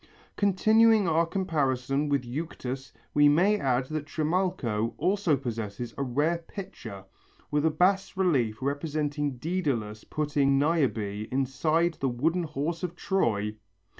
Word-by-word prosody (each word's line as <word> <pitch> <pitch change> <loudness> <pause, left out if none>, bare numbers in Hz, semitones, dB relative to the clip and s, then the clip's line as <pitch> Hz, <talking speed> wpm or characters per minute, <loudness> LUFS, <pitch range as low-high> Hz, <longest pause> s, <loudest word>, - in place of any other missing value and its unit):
Continuing 215 +1 +4
our 165 +1 +2
comparison 145 -6 0
with 140 -3 +1
Euctus 135 -1 -5 0.2
we 145 0 +6
may 190 +8 +3
add 130 -1 +1
that 155 -1 -4
Trimalcho 155 - -1
also 180 -2 +2
possesses 115 -2 -5
a - - -4
rare 145 +6 +1
pitcher 115 - -9 0.5
with 150 +1 +2
a - - +4
bas 190 +4 +1
relief 130 - +1
representing 145 -1 -2
Dædalus 125 - -2
putting 145 -2 +1
Niobe 120 -9 0
inside 155 +6 +1
the 135 - +1
wooden 160 +9 0
horse 155 +3 -3
of 180 -2 -4
Troy! 110 - 0
145 Hz, 125 wpm, -28 LUFS, 125-170 Hz, 0.5 s, we